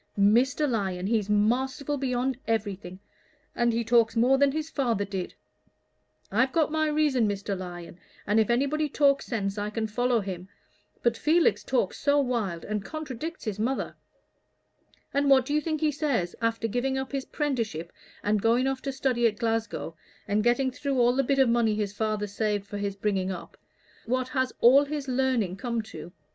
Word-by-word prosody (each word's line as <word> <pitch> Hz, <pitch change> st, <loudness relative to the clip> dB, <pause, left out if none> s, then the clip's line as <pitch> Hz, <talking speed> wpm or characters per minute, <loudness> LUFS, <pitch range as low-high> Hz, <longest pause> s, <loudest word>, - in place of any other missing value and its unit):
"Mr. 245 Hz, +9 st, +3 dB
Lyon, 190 Hz, -7 st, -1 dB
he's 210 Hz, -1 st, 0 dB
masterful 255 Hz, +7 st, +1 dB
beyond 260 Hz, -1 st, -1 dB
everything, 200 Hz, -5 st, -2 dB, 0.6 s
and 240 Hz, 0 st, +2 dB
he 230 Hz, +1 st, 0 dB
talks 230 Hz, 0 st, +3 dB
more 245 Hz, +4 st, +4 dB
than 280 Hz, -1 st, +4 dB
his 310 Hz, +2 st, -3 dB
father 235 Hz, -10 st, 0 dB
did. 190 Hz, -2 st, -5 dB, 1.0 s
I've 250 Hz, +6 st, +2 dB
got 315 Hz, -1 st, +1 dB
my 315 Hz, 0 st, +1 dB
reason, 295 Hz, -6 st, +2 dB
Mr. 200 Hz, 0 st, -2 dB
Lyon, 175 Hz, -2 st, -8 dB, 0.3 s
and 210 Hz, +2 st, +3 dB
if 220 Hz, -, +2 dB
anybody 280 Hz, +5 st, +1 dB
talks 280 Hz, -1 st, +2 dB
sense 205 Hz, -4 st, -2 dB
I 205 Hz, +1 st, -2 dB
can 220 Hz, +1 st, -2 dB
follow 245 Hz, +2 st, +1 dB
him; 185 Hz, -1 st, -6 dB, 0.5 s
but 235 Hz, -1 st, +3 dB
Felix 320 Hz, +6 st, +2 dB
talks 245 Hz, -8 st, -1 dB
so 290 Hz, 0 st, +3 dB
wild, 230 Hz, -11 st, -1 dB
and 210 Hz, -1 st, -3 dB
contradicts 310 Hz, -, -6 dB
his 210 Hz, -2 st, -3 dB
mother. 255 Hz, +5 st, -1 dB, 1.2 s
And 280 Hz, 0 st, +2 dB
what 265 Hz, -2 st, +6 dB
do 290 Hz, -, -3 dB
you 300 Hz, -, +2 dB
think 310 Hz, -1 st, -2 dB
he 310 Hz, -1 st, +3 dB
says, 270 Hz, -, -1 dB
after 230 Hz, 0 st, 0 dB
giving 250 Hz, +4 st, -1 dB
up 265 Hz, 0 st, -4 dB
his 275 Hz, -1 st, -3 dB
'prenticeship, 230 Hz, -, -2 dB, 0.3 s
and 205 Hz, 0 st, +1 dB
going 235 Hz, +4 st, +3 dB
off 270 Hz, -1 st, -1 dB
to 275 Hz, -, -3 dB
study 255 Hz, -3 st, +1 dB
at 215 Hz, -2 st, -3 dB
Glasgow, 225 Hz, -7 st, -2 dB, 0.3 s
and 210 Hz, +1 st, +1 dB
getting 255 Hz, +3 st, +2 dB
through 275 Hz, +1 st, -2 dB
all 245 Hz, +1 st, +4 dB
the 275 Hz, -, +3 dB
bit 275 Hz, +2 st, +1 dB
of 265 Hz, -1 st, +5 dB
money 230 Hz, -2 st, +2 dB
his 205 Hz, -2 st, -2 dB
father 215 Hz, 0 st, -1 dB
saved 205 Hz, 0 st, -2 dB
for 205 Hz, 0 st, -6 dB
his 200 Hz, -1 st, -2 dB
bringing 195 Hz, -2 st, -1 dB
up 180 Hz, -2 st, -8 dB, 0.5 s
what 255 Hz, +1 st, 0 dB
has 260 Hz, -1 st, 0 dB
all 270 Hz, +5 st, +7 dB
his 290 Hz, -1 st, -4 dB
learning 250 Hz, -7 st, 0 dB
come 235 Hz, +2 st, -2 dB
to? 175 Hz, -6 st, -10 dB
235 Hz, 180 wpm, -27 LUFS, 205-270 Hz, 1.2 s, all